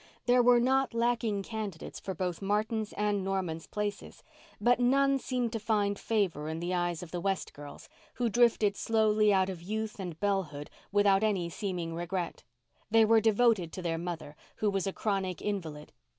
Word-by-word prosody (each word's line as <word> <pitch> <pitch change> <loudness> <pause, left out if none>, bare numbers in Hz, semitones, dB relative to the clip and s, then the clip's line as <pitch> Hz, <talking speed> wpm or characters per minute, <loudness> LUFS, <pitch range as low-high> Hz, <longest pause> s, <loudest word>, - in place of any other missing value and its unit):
There 245 0 +5
were 245 0 +6
not 265 0 +2
lacking 230 -4 0
candidates 210 -6 -6
for 190 - -5
both 180 0 -3
Martin's 215 +2 -1
and 205 -2 0
Norman's 185 -4 -2
places, 210 -1 -5 0.4
but 245 +1 +3
none 275 +2 +3
seemed 250 -3 -2
to 225 - -2
find 205 -2 0
favour 185 -9 -1
in 160 +1 -4
the 175 +2 -2
eyes 175 -1 -1
of 170 - -10
the 175 - -3
West 195 +1 -2
girls, 145 0 -11 0.3
who 240 0 0
drifted 225 -3 +3
slowly 215 -1 +3
out 190 -1 +3
of 185 -3 -6
youth 215 +3 -4
and 175 -4 -6
bellehood 185 -8 -2 0.2
without 200 -1 +4
any 190 -6 0
seeming 175 -4 -3
regret. 175 +1 -3 0.5
They 225 0 +5
were 225 0 +5
devoted 220 -5 +3
to 185 - -6
their 165 -1 -1
mother, 165 -4 -5 0.2
who 210 -1 0
was 195 -1 -1
a - - 0
chronic 190 -4 -2
invalid. 165 -8 -5
200 Hz, 175 wpm, -30 LUFS, 175-220 Hz, 0.5 s, were